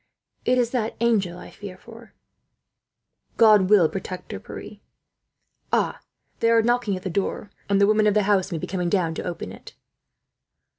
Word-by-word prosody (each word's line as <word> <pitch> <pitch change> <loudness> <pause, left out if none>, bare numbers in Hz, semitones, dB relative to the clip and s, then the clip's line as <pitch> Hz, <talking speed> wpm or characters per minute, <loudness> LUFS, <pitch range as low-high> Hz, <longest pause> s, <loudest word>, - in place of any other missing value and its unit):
It 255 - +3
is 240 -2 +1
that 230 -3 -2
angel 205 -7 +1
I - - -11
fear 195 -3 -10
for." 230 -1 -15 1.2
"God 210 -4 +6
will 200 -6 +6
protect 185 +1 -7
her, - - -5
Pierre. - - -10 0.9
Ah! - - +1 0.4
They 230 - +2
are 230 -1 +4
knocking 240 -3 +1
at 185 - -10
the 190 - -3
door, 200 +2 -3 0.2
and 200 -1 +3
the 200 - +6
women 215 +1 +3
of 210 - +2
the 210 - +3
house 195 -1 +1
may 170 - -2
be - - -4
coming 180 -2 -2
down 170 -4 +1
to - - -5
open 175 -1 -5
it." - - -13
205 Hz, 180 wpm, -24 LUFS, 185-225 Hz, 1.2 s, God